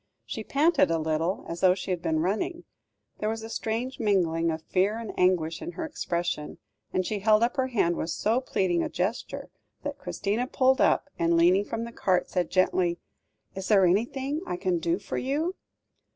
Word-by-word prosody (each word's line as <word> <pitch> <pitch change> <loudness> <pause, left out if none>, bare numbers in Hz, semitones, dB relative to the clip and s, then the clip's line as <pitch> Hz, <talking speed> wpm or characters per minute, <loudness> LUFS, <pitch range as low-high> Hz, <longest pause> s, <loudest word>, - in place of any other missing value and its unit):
She 220 - -5
panted 295 +4 +3
a 165 - +2
little, 160 +3 -1
as 170 - -5
though 185 0 +5
she 190 0 -5
had 180 -2 -1
been 155 -2 0
running; 215 - -1 0.6
there 215 - 0
was 225 0 -3
a 225 - -7
strange 230 +5 -3
mingling 170 -7 +2
of 160 0 -3
fear 195 +6 +1
and 230 -2 -5
anguish 175 -3 +2
in 345 +2 -5
her 335 - -4
expression, 170 - -3 0.3
and 185 - 0
she 210 +1 -2
held 215 +2 +4
up 240 - +1
her 260 -1 +2
hand 200 -9 +1
with 160 - -2
so 225 +8 +1
pleading 180 -8 0
a - - -2
gesture, 195 +7 -3 0.3
that 290 -1 -4
Christina 215 +5 -2
pulled 265 0 +3
up, - - +3
and 170 0 +3
leaning 180 +4 +4
from 225 +1 -3
the 235 - -6
cart, 185 -5 0
said 180 -3 0
gently: 185 -2 +2 0.6
"Is 190 0 -5
there 200 -3 +5
anything 260 - 0
I 180 - -2
can 180 -1 0
do 170 +1 0
for 200 - -4
you?" 300 +7 -1
195 Hz, 195 wpm, -27 LUFS, 175-235 Hz, 0.6 s, though